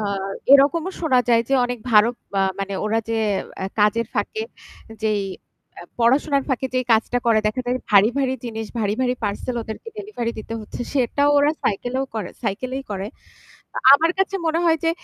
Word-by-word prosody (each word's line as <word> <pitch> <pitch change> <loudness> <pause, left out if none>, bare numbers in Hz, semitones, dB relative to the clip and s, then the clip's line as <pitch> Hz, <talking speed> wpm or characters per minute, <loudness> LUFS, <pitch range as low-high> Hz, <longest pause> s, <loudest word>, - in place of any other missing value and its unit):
আ - - -2 0.5
এরকমও 300 +6 +5
শোনা 265 -7 +3
যায় 230 -1 +4
যে 275 - +2
অনেক 245 -1 -3
ভারো 215 0 +6 0.3
আ - - +3 0.2
মানে 195 0 -3
ওরা 220 +1 +1
যে 230 - 0 0.4
অ্যা 190 - -3
কাজের 215 +2 +2
ফাঁকে 440 0 -2 0.6
যেই 215 -2 +1 0.6
আ - - -9 0.2
পড়াশোনার 275 +4 +2
ফাঁকে 265 -1 0
যেই 255 0 +1
কাজটা 225 +2 +2
করে, 225 -2 +4
দেখা 215 +4 -1
যায় 250 +1 0
ভারী, 205 +2 +6
ভারী 265 -1 +1
জিনিস 225 -2 -5
ভারী, 210 -1 0
ভারী 250 -1 +1
পার্সেল 210 +5 -3
ওদেরকে 220 - -8
ডেলিভারি 395 - -4
দিতে 220 +1 -6
হচ্ছে, 215 - -9
সেটাও 285 +2 +2
ওরা 290 +1 +4
সাইকেলেও 245 +6 -1
করে 210 -5 -4
সাইকেলেই 255 +6 -3
করে। 195 0 -3 0.7
আ - - 0
আমার 325 +4 +4
কাছে 385 0 +1
মনে 320 +1 +1
হয় 325 -1 +4
যে 330 - +3
245 Hz, 180 wpm, -22 LUFS, 215-280 Hz, 0.7 s, ভারো